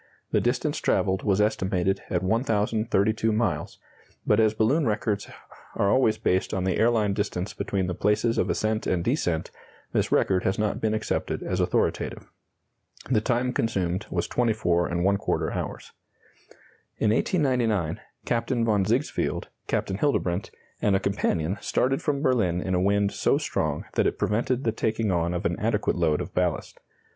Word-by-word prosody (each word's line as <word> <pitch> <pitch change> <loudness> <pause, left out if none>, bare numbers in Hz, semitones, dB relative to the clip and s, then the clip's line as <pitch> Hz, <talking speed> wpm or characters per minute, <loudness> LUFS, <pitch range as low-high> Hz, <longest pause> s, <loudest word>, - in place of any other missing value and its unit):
The - - +2
distance - - 0
travelled 95 0 +1
was 100 -1 +1
estimated 95 -3 +1
at 90 - 0
1,032 110 0 +1
miles, 110 +1 -1 0.5
but - - +3
as 110 -1 +3
balloon 125 +7 +2
records 105 -1 -1 0.5
are 100 - +2
always 130 -4 +3
based 95 +1 0
on 95 - -1
the 95 -1 0
airline 110 -3 +3
distance 100 -1 -2
between 95 -2 -2
the 90 - -2
places 105 +5 +1
of - - +1
ascent 110 0 -1
and 90 -2 0
descent, 90 - -1 0.4
this - - +1
record 95 -1 +2
has 95 - 0
not 105 -1 -1
been 110 -1 +1
accepted 110 - -2
as - - -2
authoritative. - - -1 0.8
The 110 -4 +3
time 125 +2 0
consumed 95 -5 -1
was - - -1
24¼ 95 -5 0
hours. - - -5 1.1
In 110 - +2
1899, 115 - +1 0.3
Captain 115 0 0
von 105 -3 +2
Sigsfield, 120 +9 -1 0.2
Captain 95 +1 -1
Hildebrandt, 95 -10 0 0.3
and 100 -2 +3
a - - +3
companion 95 -2 -1
started 135 +2 0
from 145 -1 -1
Berlin 110 - +2
in 95 +1 -2
a 90 - +2
wind 100 +1 +2
so - - +2
strong - - -2
that - - +2
it - - -2
prevented 120 +4 0
the 110 - +1
taking 110 -1 -1
on 85 -1 0
of 90 - -3
an 85 0 0
adequate 105 -1 0
load 80 -4 +1
of - - -7
ballast. 90 -2 -1
105 Hz, 155 wpm, -26 LUFS, 95-115 Hz, 1.1 s, but